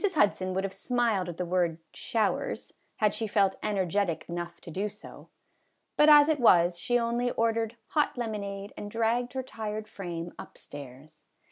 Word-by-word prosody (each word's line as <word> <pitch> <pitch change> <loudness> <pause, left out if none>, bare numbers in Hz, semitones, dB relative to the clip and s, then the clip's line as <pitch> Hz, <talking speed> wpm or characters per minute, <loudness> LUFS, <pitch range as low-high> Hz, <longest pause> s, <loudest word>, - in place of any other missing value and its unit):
Hudson 190 -7 +2
would 190 - 0
have 195 -1 -3
smiled 230 -7 0
at 170 - -7
the 180 - -2
word 175 -2 +1
" - - -48
showers 225 -5 -1
" - - -44
had 210 -2 +2
she 225 - -1
felt 200 -2 +2
energetic 195 -3 0
enough 175 0 -5
to 170 - -9
do 195 +5 -2
so; 210 +1 -13 0.7
but 300 +1 +6
as 295 -1 +9
it 310 -2 +2
was, 175 -6 +5
she 245 - +1
only 240 +1 0
ordered 230 0 0
hot 300 -4 +1
lemonade 200 -4 -4
and 205 - -6
dragged 230 +3 0
her 260 0 -2
tired 215 -3 -5
frame 175 -3 -6
up - - -10
stairs. 145 +2 -12
205 Hz, 175 wpm, -29 LUFS, 180-230 Hz, 0.7 s, as